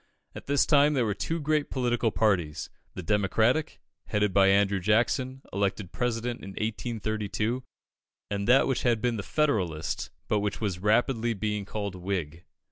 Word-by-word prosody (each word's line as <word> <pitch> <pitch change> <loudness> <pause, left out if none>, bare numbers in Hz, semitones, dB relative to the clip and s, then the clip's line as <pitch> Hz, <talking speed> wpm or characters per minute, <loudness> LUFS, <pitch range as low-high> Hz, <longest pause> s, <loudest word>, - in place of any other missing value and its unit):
At - - -10
this 140 0 +3
time 150 0 +4
there 125 -3 +2
were 105 - 0
two 165 +11 -3
great 150 -1 0
political 120 -3 +1
parties 90 -9 0 0.2
the 95 - -5
Democratic, 110 - +1 0.3
headed 105 -2 +1
by 95 0 +5
Andrew 100 0 +3
Jackson, 125 +6 +1
elected 100 -1 -1
President 120 -1 -2
in 95 - -8
1832, 110 +1 -2 0.7
and 100 0 -2
that 130 +3 +6
which 135 - 0
had 120 -2 +2
been 120 0 0
the - - -2
Federalist, 95 - -1 0.2
but 105 - +2
which 105 0 -2
was 100 -5 -2
rapidly 115 +3 +2
being 105 0 -2
called 100 -1 -4
Whig. 90 -3 -4
110 Hz, 155 wpm, -28 LUFS, 100-125 Hz, 0.7 s, that